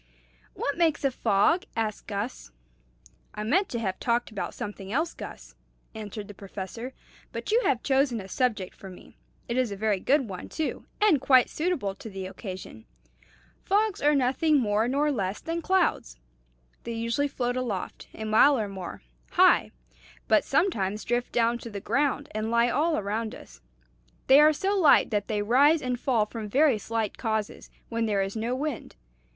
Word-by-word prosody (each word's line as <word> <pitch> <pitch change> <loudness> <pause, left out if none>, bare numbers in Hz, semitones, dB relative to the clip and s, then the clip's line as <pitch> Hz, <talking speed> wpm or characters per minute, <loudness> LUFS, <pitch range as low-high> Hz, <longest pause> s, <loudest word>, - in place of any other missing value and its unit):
"What 285 +4 -2
makes 325 -4 +2
a 275 - +2
fog?" 245 - +2
asked 220 -2 -3
Gus. 205 - -4 0.9
"I 210 - -4
meant 355 - +2
to 235 - -3
have 190 -5 -3
talked 240 0 0
about 200 - -5
something 200 -1 -6
else, 320 +7 0
Gus," - - -10 0.4
answered 210 -1 -7
the 205 - -9
Professor; 200 +6 -7 0.4
"but - - -5
you 465 +3 +4
have 245 -3 +1
chosen 265 -3 +2
a 190 - -8
subject 210 -3 -1
for 195 - -11
me. 180 - -14 0.3
It 235 - -2
is 255 -4 +1
a - - -3
very 205 -1 0
good 270 +4 +2
one, 185 -3 -7
too, 315 - -4
and 390 -11 +4
quite 260 -2 +5
suitable 305 - -1
to 220 - -10
the 190 -2 -6
occasion. 185 - -8 0.8
Fogs 415 +1 +1
are 295 +1 +4
nothing 280 +4 +2
more 215 -1 +1
nor 290 +4 +1
less 195 -6 -2
than 330 +1 -3
clouds. 340 - +1 0.6
They 235 - -5
usually 230 +5 0
float 245 -3 -2
aloft, 235 -7 -4
a 220 - -6
mile 220 +6 +5
or 215 -3 -1
more, 190 - -8 0.3
high, - - +5 0.6
but 215 - +4
sometimes 215 - 0
drift 240 +1 -1
down 235 0 +1
to 235 - -8
the 205 -2 -6
ground 285 +5 0
and 215 +1 -3
lie 235 +1 +3
all 315 +6 +1
around 215 +2 -3
us. - - -14 0.6
They 270 +2 +7
are 305 +1 +7
so 385 +6 -1
light 325 -10 +5
that 205 -2 -1
they 210 -2 -1
rise 280 +9 +5
and 250 -3 -3
fall 235 -6 +2
from 215 -1 -7
very 270 -1 +3
slight 225 -1 -3
causes, 220 -3 -3 0.2
when 230 -1 -1
there 200 -2 +1
is 195 +2 -5
no 230 +3 -1
wind. 280 -3 -4
235 Hz, 175 wpm, -27 LUFS, 205-280 Hz, 0.9 s, They